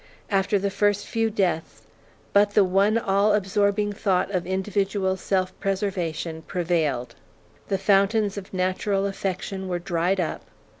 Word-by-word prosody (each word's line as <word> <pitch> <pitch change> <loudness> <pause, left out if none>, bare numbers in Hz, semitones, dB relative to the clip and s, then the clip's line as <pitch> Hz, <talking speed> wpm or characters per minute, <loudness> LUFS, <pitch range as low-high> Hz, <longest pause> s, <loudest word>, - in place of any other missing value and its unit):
After 195 +1 +2
the 200 0 -1
first 205 0 +1
few 225 0 0
deaths, 185 -6 -1 0.5
but 205 0 +4
the 205 - +7
one 195 +4 +3
all 205 -1 +2
absorbing 205 +1 +1
thought 195 -2 0
of 180 -3 -2
individual 190 0 0
self 185 -1 -1
preservation 180 -5 -2
prevailed. 155 -9 -1 0.5
The 195 - 0
fountains 200 +1 +2
of 200 -2 -8
natural 190 +2 0
affection 195 -1 -3
were 180 -1 -1
dried 175 +2 0
up. 170 - -2
195 Hz, 135 wpm, -24 LUFS, 185-205 Hz, 0.5 s, the